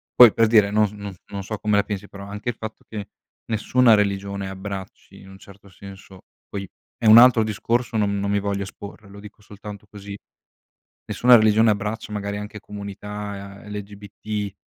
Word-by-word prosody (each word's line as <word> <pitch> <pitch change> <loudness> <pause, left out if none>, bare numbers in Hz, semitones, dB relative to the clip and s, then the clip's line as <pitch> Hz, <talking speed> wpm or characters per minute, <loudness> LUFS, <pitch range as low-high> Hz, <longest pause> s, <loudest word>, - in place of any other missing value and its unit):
Poi 120 -4 +9
per 115 -1 +3
dire, 105 -3 +4
non 105 0 +3
s 100 - -11
no 100 -2 -8
non 100 -1 -6
so 110 +2 -5
come 105 -1 +1
la 100 - +3
pensi, 100 -1 -5
però 100 0 -10
anche 105 +4 -5
il 115 - -3
fatto 110 -1 -9
che 105 -2 -7 0.4
nessuna 115 +2 +3
religione 100 -1 -1
abbracci 95 0 -8
in 95 - -14
un 95 - -13
certo 100 0 -16
senso 95 0 -13 0.3
poi 100 -1 -5 0.3
è 115 - -5
un 110 +1 +10
altro 120 -2 +7
discorso, 115 +2 -1
non 100 -1 0
non 100 0 -1
mi 100 - +2
voglio 100 0 -2
esporre, 100 +1 -11
lo 100 +1 -12
dico 105 0 -13
soltanto 105 0 -11
così. 100 -1 -9 0.9
Nessuna 125 0 +5
religione 110 0 +4
abbraccia 105 +1 -3
magari 100 0 -3
anche 105 0 -8
comunità 100 -1 -8
LGBT, 105 0 -6
105 Hz, 180 wpm, -23 LUFS, 100-110 Hz, 0.9 s, un